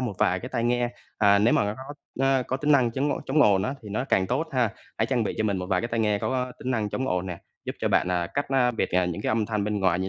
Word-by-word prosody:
một 125 -5 -2
vài 90 +1 +2
cái 125 - -6
tai 120 -3 -2
nghe, 120 0 +1 0.3
à, 100 -1 +5
nếu 110 +4 +4
mà - - +3
nó 105 +1 -2
có, 135 +4 -9 0.3
ơ, 135 -1 +3
có 130 - -1
tính 150 +2 +2
năng 130 -4 +4
chống 135 +5 0
ô - - -4
chống 145 +2 +4
ồn 95 -5 +4
á 130 - -2
thì 105 - -9
nó 110 +5 -2
càng 95 -8 +2
tốt 135 +9 -1
ha. 125 -4 +2 0.3
Hãy - - +2
trang 125 -4 +1
bị - - -2
cho 110 - +1
mình 100 -2 +1
một 90 - -4
vài 90 -1 +1
cái 120 - -3
tai 115 -1 -1
nghe 105 -2 +2
có 125 +1 -2
tính 130 - -4
năng 110 -4 0
chống 130 +4 -2
ồn 90 0 -1
nè, 90 -2 -5 0.3
giúp - - -4
cho - - 0
bạn, - - +2
à, 90 -1 0
cách, 140 - 0
á, 130 -2 +3
biệt, 115 - -2
à, 90 0 +2
những 90 +3 -3
cái - - -1
âm 110 -1 +1
thanh 105 -2 -1
bên 105 -1 -1
ngoài 90 -2 +2
như 95 +1 -2
115 Hz, 325 wpm, -26 LUFS, 100-130 Hz, 0.3 s, à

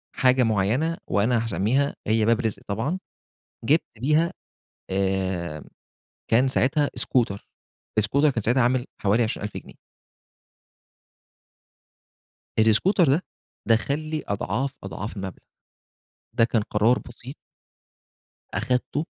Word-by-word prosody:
حاجة 130 0 +4
معينة 115 - +1
وأنا 110 +4 +2
هاسميها 115 +6 +1
هي 110 0 +3
باب 115 +1 +3
رزق 110 -5 -2
طبعًا 115 - -2 0.7
جِبت 155 +7 +4 0.2
بيها 155 +7 +2 0.6
آآ، 95 -5 -1 0.7
كان 125 +4 +5
ساعتها 145 +3 +2
scooter 115 -6 +1 0.6
الscooter 140 +8 +3
كان 115 -6 -2
ساعتها 120 +3 +3
عامل 125 +1 +1 0.2
حوالي 105 +4 +3
20.000 110 - -3
جنيه. - - -11 2.9
الscooter 115 - +4
ده 155 +7 +2 0.4
دخَّل 115 +6 +2
لي 155 0 -4
أضعاف، 120 +7 -2
أضعاف 100 +2 -6
المبلغ. 95 -1 -6 0.9
ده 115 -1 +4
كان 115 -2 +1
قرار 110 +4 +2
بسيط 125 +3 -10 1.2
أخدته 130 +5 -1
120 Hz, 105 wpm, -24 LUFS, 105-140 Hz, 2.9 s, كان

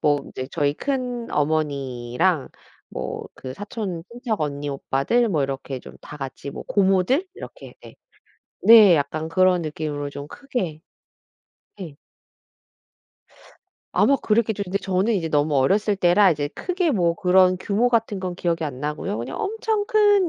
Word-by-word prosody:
뭐 145 -2 +2
이제 130 - -5
저희 145 -3 0
큰 250 - -3
어머니랑 145 0 0 0.4
뭐 - - -5
그 130 - -8
사촌 200 - -5
친척 235 -2 -3
언니 145 -1 -3
오빠들 140 - 0
뭐 155 -7 +1
이렇게 135 -1 -4
좀 - - -13
다 150 - -10
같이 135 0 -7
뭐 - - -7
고모들 195 - +2
이렇게 - - -11
네. - - -13 0.7
네. 215 -6 +8
약간 155 +2 -2
그런 185 +1 +3
느낌으로 150 -2 -4
좀 140 0 -8
크게 185 - -4 1.0
네. 170 -7 -8 2.0
아마 275 - +4
그랬겠죠. 220 -3 0
근데 195 +1 -2
저는 195 +4 0
이제 170 -5 -1
너무 150 0 +1
어렸을 200 +10 +2
때라 185 +2 +5
이제 145 -3 -1
크게 360 - -1
뭐 175 - +2
그런 185 +1 +4
규모 210 +6 +1
같은 225 -4 0
건 185 -1 -3
기억이 170 -2 -1
안 135 -4 -6
나고요. 150 -7 -3
그냥 120 +3 -5
엄청 435 0 -1
큰 410 -4 +4
180 Hz, 275 characters per minute, -23 LUFS, 145-220 Hz, 2.0 s, 네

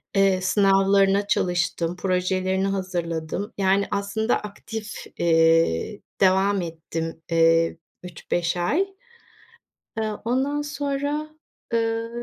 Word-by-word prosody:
Eee, 195 -1 +3
sınavlarına 195 +1 +3
çalıştım, 175 -2 0
projelerini 185 +1 0
hazırladım. 180 -1 -3
Yani, 195 +1 +2
aslında 200 +3 0
aktif, 210 +1 -7 0.2
eee, 165 - +2 0.2
devam 190 +1 +3
ettim, 165 0 -5
eee, 165 0 +3 0.3
3-5 175 0 -2
ay. 305 - +1 1.1
Eee, 220 -1 0
ondan 270 +5 0
sonra, 290 +1 -3 0.4
eee, 225 0 0
195 Hz, 90 wpm, -24 LUFS, 170-215 Hz, 1.1 s, Eee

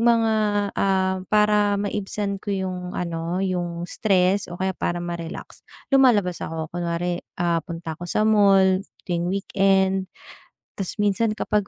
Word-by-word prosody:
mga, 230 -1 +3 0.4
ah, 190 -1 +1
para 210 -1 +3
maibsan 200 0 -3
ko - - -11
yung 185 -2 -3
ano, 170 +2 -2
yung 175 -2 -2
stress, 190 0 +1
o 175 - -7
kaya 190 +1 -1
para 175 -1 -3
ma-relax, 170 -1 -6 0.3
lumalabas 215 -10 +4
ako. 160 -1 -5
Kunwari 175 0 -2 0.2
ah, 170 -1 +1
punta 165 -1 -6
ako 175 +2 -8
sa 215 - +1
mall, 195 -3 +5 0.2
tuwing 175 -1 -1
weekend. 190 -1 +1 0.7
Ta's 190 - -2
minsan 215 +1 +1
kapag 210 -2 0
190 Hz, 135 wpm, -23 LUFS, 175-205 Hz, 0.7 s, mall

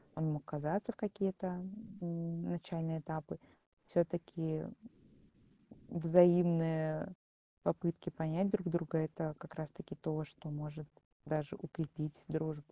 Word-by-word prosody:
он 155 0 +1
мог 150 -2 -3
казаться 155 +10 -1
в - - -18
какие-то, 195 -2 -1 0.5
м, 170 -1 -2
начальные 165 -1 -2
этапы. 155 -1 -5 0.5
Всё-таки, 165 -2 +1 1.3
взаимные 170 -1 +6 0.5
попытки 170 0 0
понять 160 +5 +1
друг 195 -4 +1
друга- 165 -1 +1
это 155 0 -1
как - - -11
раз-таки 155 -2 -6
то, 155 0 -2
что 155 +2 -10
может 150 0 -5 0.4
даже 150 -1 0
укрепить 155 -2 -4
дружбу. 155 -1 -2
160 Hz, 110 wpm, -37 LUFS, 155-175 Hz, 1.3 s, взаимные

